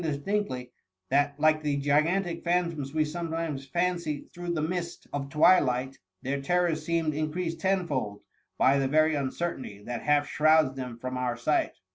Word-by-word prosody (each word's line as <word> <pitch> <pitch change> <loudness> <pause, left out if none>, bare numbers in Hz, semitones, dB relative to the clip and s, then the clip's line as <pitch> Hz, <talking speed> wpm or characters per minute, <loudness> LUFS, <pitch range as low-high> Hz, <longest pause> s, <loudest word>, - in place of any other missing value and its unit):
distinctly, 145 -4 -2 0.4
that, 145 +1 +1
like 155 0 +4
the 145 -2 0
gigantic 165 +5 +1
phantoms 170 -5 0
we 155 0 +1
sometimes 160 -3 -4
fancy 170 -1 -1
through 175 0 -4
the 170 - -1
mist 170 +1 -3
of 140 -1 -3
twilight, 135 -5 +3 0.3
their 140 +2 -2
terrors 170 +1 +1
seemed 165 -1 0
increased 165 +3 -2
tenfold 170 - -1 0.4
by 135 +2 +4
the 135 - +1
very 155 +3 +3
uncertainty 135 -7 -3
that 120 +1 -4
half 145 -1 +2
shrouds 155 -2 +3
them 125 -3 -6
from 130 +1 -4
our 125 -2 -1
sight. 150 +5 0
155 Hz, 150 wpm, -28 LUFS, 135-170 Hz, 0.4 s, like